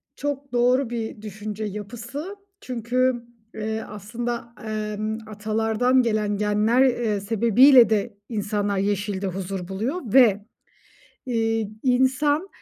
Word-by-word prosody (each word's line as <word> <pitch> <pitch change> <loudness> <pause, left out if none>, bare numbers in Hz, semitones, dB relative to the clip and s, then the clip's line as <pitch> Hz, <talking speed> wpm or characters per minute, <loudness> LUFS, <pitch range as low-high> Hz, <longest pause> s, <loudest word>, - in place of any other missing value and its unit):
Çok 280 -1 -4
doğru 250 +1 +3
bir 225 -3 -5
düşünce 215 0 -6
yapısı 235 - -6 0.3
çünkü, 250 0 -1 0.3
eee, 220 0 -3
aslında, 235 +3 -5
emm, 215 0 -3
atalardan 220 +4 +1
gelen 215 -3 0
genler, 210 +4 +2
eee, 240 -5 0
sebebiyle 235 +4 +6
de 215 0 -1
insanlar 205 -2 -1
yeşilde 200 0 -1
huzur 185 -1 -4
buluyor 230 - -3
ve, 215 -6 +5 0.8
iii, 225 -3 0
insan 265 +6 +2
220 Hz, 105 wpm, -24 LUFS, 210-245 Hz, 0.8 s, sebebiyle